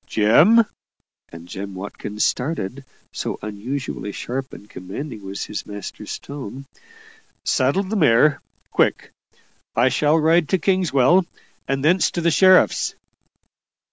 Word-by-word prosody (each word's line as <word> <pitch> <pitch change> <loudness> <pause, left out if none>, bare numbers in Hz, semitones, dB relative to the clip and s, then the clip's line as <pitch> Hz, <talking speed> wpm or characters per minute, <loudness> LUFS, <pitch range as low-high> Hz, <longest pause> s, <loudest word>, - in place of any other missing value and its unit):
"Jem" 160 - +5 0.6
and 85 +1 -12
Jem 100 +1 -7
Watkins 100 +2 -3
started, 135 -2 -2 0.3
so - - -4
unusually 110 +2 -5
sharp 130 +5 -5
and 105 - -12
commanding 105 +5 -8
was 95 +1 -5
his 105 - -5
master's 105 -2 -7
tone 135 -1 -8 0.8
"Saddle 140 +10 +2
the 200 +3 -4
mare 145 - +4 0.3
quick. - - +1 0.6
I 120 +3 +4
shall 150 +4 +2
ride 160 0 +3
to 190 - +3
Kingswell, 180 -2 +2 0.4
and 135 +1 -1
thence 175 +3 +4
to 175 - -3
the 170 0 +2
sheriff's." 185 +3 +4
135 Hz, 120 wpm, -21 LUFS, 105-165 Hz, 0.8 s, Jem